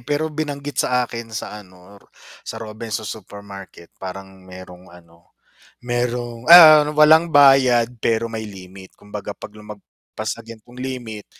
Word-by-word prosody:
pero 150 +4 -3
binanggit 145 -2 -4
sa 125 0 0
akin 115 -1 -8
sa 110 -1 -7
ano 95 +1 -18
ro - - -27 0.3
sa 110 - -9
Robinsons 110 0 -6
Supermarket 100 -4 -13
parang 95 0 -9
mayrong 95 -1 -14
ano 85 -1 -21 0.5
mayrong 120 -1 -4
ah, 155 -3 +9
walang 155 +2 +4
bayad 135 -4 +5
pero 115 +1 -1
may 110 -1 -6
limit, 95 -1 -13
kumbaga 105 0 -9
'pag - - -11
lumagpas 105 -1 -10
sa 115 - -13
gan'tong 115 +2 -14
limit 125 -5 -7
115 Hz, 135 wpm, -20 LUFS, 100-125 Hz, 0.5 s, ah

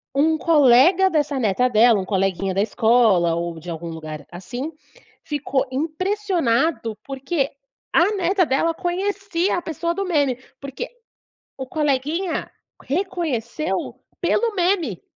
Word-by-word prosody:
um 315 +3 +3
colega 320 +5 +5
dessa 295 -4 0
neta 225 +2 +2
dela, 230 -2 +5
um 185 - -3
coleguinha 195 -1 0
da 195 - +1
escola 220 -6 +3
ou 170 -1 -4
de 175 +2 -10
algum 165 +1 -6
lugar 155 -2 -8
assim, 245 - -6 0.5
ficou 285 -3 -1
impressionado, 320 - 0
porque 275 +1 -2 0.4
a 370 +6 +4
neta 370 0 +2
dela 325 +5 +1
conhecia 380 0 -1
a - - -2
pessoa 335 +1 -3
do 395 0 -2
meme, 285 -8 +1 0.2
porque 280 - -5 0.7
o 265 -1 -5
coleguinha 305 +5 -1 0.3
reconheceu 310 - -2 0.2
pelo 460 -3 +1
meme 350 - 0
285 Hz, 125 wpm, -22 LUFS, 230-345 Hz, 0.7 s, colega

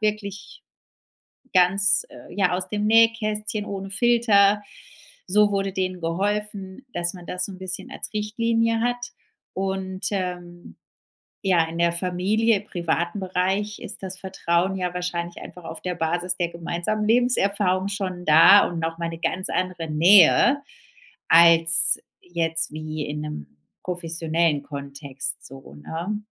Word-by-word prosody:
wirklich 205 -1 -4 0.9
ganz, 195 - +4
äh, - - -14
ja, 195 -3 +1
aus 185 - -3
dem 210 0 -2
Nähkästchen 215 -2 +2
ohne 195 -1 -6
Filter. 210 -2 +3 0.7
So 210 +2 +4
wurde 195 -1 -1
denen 185 -1 -3
geholfen, 200 +5 -3
dass 175 -2 -1
man 180 -2 -11
das 180 0 -2
so 200 - -9
'n 185 - -12
bisschen 185 -1 -3
als - - -6
Richtlinie 230 +2 0
hat. 245 0 -3 0.4
Und, 190 0 -3
ähm, 180 -2 -5 0.7
ja, 180 -4 +3
in 165 +1 -7
der 170 0 +3
Familie, 195 +5 0
privaten 175 -1 -3
Bereich 190 +3 -2
ist - - -7
das 190 0 -4
Vertrauen 190 0 -1
ja 180 -1 -3
wahrscheinlich 175 -1 -4
einfach 180 - -11
auf 165 0 -7
der 180 -1 -4
Basis 175 +2 -1
der 175 -2 -1
gemeinsamen 170 +5 -3
Lebenserfahrung 200 -5 +1
schon 185 -3 -4
da 165 +6 +7
und 175 - -6
noch 165 0 -3
mal 170 0 -2
'ne 165 - -8
ganz 185 +2 -2
andere 180 -3 -3
Nähe, 190 - +5 0.7
als 165 0 +7 0.2
jetzt 165 -2 -1
wie 155 -1 -5
in 150 +1 -5
'nem 75 - -8 0.3
professionellen 165 -3 -1
Kontext 140 -1 -6
so, 135 - -12
ne? 170 - -5
185 Hz, 135 wpm, -23 LUFS, 170-205 Hz, 0.9 s, da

